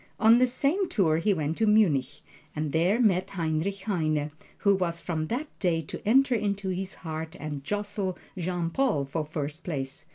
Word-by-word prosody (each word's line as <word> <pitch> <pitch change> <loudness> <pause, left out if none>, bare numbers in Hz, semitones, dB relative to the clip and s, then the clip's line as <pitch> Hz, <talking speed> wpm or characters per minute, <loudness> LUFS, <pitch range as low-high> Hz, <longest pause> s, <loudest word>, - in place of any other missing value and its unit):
On 225 +2 +7
this 255 -1 +3
same 325 +9 +1
tour 165 -7 +2
he 180 +6 +2
went 160 -3 -1
to 220 - +3
Munich, 170 - +3 0.3
and 155 -1 -2
there 175 - +2
met 190 -6 +3
Heinrich 170 +2 -2
Heine, 155 -7 0 0.3
who 200 - +3
was 175 -3 -1
from 155 -3 -3
that 250 - -2
day 170 -4 +1
to - - -8
enter 260 +3 +5
into 200 -3 -1
his 185 +1 -3
heart 160 0 -6
and 145 -2 -5
jostle 205 +1 -2 0.2
Jean 175 -2 -2
Paul 220 - +1
for 155 +3 -2
first 150 +1 -5
place. 135 -5 -5
180 Hz, 175 wpm, -27 LUFS, 155-205 Hz, 0.3 s, On